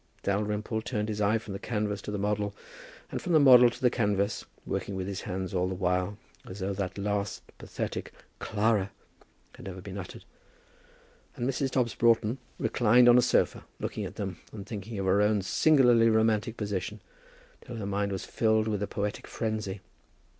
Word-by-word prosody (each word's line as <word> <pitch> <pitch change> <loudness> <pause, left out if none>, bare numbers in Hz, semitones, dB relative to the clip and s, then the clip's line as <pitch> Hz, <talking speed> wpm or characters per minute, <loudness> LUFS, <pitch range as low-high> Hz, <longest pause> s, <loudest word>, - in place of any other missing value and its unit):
Dalrymple 105 +2 -1
turned 110 -2 -2
his 105 -1 -2
eyes 110 +2 +2
from 100 - -7
the 100 - -5
canvas 105 -3 -2
to - - -7
the 105 - -2
model, 105 0 -1 0.6
and - - -3
from 175 - -2
the 155 - +7
model 125 -4 +8
to - - -10
the 125 -2 +3
canvas, 100 -3 0 0.2
working 100 - -3
with 95 -1 -3
his 100 -1 -4
hand 95 -1 -4
all 90 0 +1
the 95 - -3
while, 90 +2 0 0.3
as 95 - -8
though 100 +1 -2
that 95 -1 -4
last 100 -1 -2 0.2
pathetic - - -5 0.3
"Clara" 105 -2 +1 0.6
had - - -12
never 95 -1 -6
been 100 +1 -7
uttered; 90 - -9 1.1
and 120 - -2
Mrs. 135 0 0
Dobbs 125 -4 0
Broughton 115 +1 +2 0.2
reclined 120 +1 +4
on 120 0 +8
a - - +5
sofa, - - +1 0.2
looking - - -3
at - - -6
them - - -5
and 100 -3 -8
thinking 105 +1 -6
of 95 - -2
her 95 +2 +3
own 105 -1 +2
singularly 120 -1 +5
romantic 110 0 +2
position, 105 0 -3 0.6
till 120 - -8
her 110 -3 -4
mind 100 0 -1
was 95 - -4
filled 110 -1 +1
with 105 -2 -1
a 105 - -1
poetic 105 0 -3
frenzy. 110 -3 -3
105 Hz, 180 wpm, -29 LUFS, 100-115 Hz, 1.1 s, model